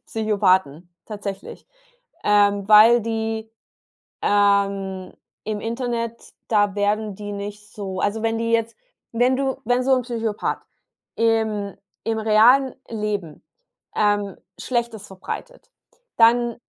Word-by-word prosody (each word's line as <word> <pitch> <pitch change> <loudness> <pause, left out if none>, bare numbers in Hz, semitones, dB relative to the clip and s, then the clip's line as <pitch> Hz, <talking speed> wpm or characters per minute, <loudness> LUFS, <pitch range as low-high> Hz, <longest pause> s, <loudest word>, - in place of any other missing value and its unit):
Psychopathen, 190 -7 +1 0.2
tatsächlich. 200 -2 -7 0.6
Ähm, 205 -1 +3
weil 220 +3 +8
die, 225 0 -3 0.7
ähm, 200 -2 +1 0.3
im 215 -1 -3
Internet 235 0 -4
da 205 -3 +2
werden 205 0 0
die 205 +1 -7
nicht 205 +1 -7
so 190 -3 -5
also 215 +3 -1
wenn 225 0 0
die 230 0 -1
jetzt 230 0 0 0.4
wenn 245 +3 +2
du 270 0 -1
wenn 245 +1 +2
so 265 +1 +3
'n 255 - -1
Psychopath 225 -3 -3 0.6
im 220 -3 0 0.3
im 225 -1 -1
realen 230 +5 +4
Leben, 210 -8 -4 0.5
ähm, 205 -2 +1 0.2
Schlechtes 235 -4 -2
verbreitet, - - -8 0.5
dann 235 0 +4
215 Hz, 110 wpm, -22 LUFS, 205-230 Hz, 0.7 s, weil